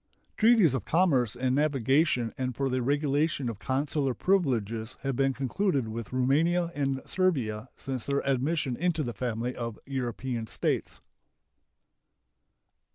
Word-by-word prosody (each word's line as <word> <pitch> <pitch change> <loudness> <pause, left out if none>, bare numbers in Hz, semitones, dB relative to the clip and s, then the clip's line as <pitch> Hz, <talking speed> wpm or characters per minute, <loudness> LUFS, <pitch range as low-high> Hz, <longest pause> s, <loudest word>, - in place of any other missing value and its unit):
Treaties 220 - +5
of 130 - -1
commerce 140 - +2
and 125 +1 0
navigation 135 -3 +2
and 130 -3 -3
for 135 +1 0
the 130 0 0
regulation 145 0 +1
of 110 -4 -6
consular 135 0 -1
privileges 115 - 0
have 135 -2 -2
been 135 +1 +2
concluded 135 - 0
with 115 0 -6
Roumania 160 +7 +2
and 135 -3 -1
Servia 130 - 0
since 130 -4 -4
their 140 0 0
admission 135 0 0
into 165 +1 0
the 120 -3 -4
family 120 +1 -2
of 115 -2 -4
European 125 -3 -3
States. - - 0
135 Hz, 130 wpm, -28 LUFS, 120-150 Hz, -, Treaties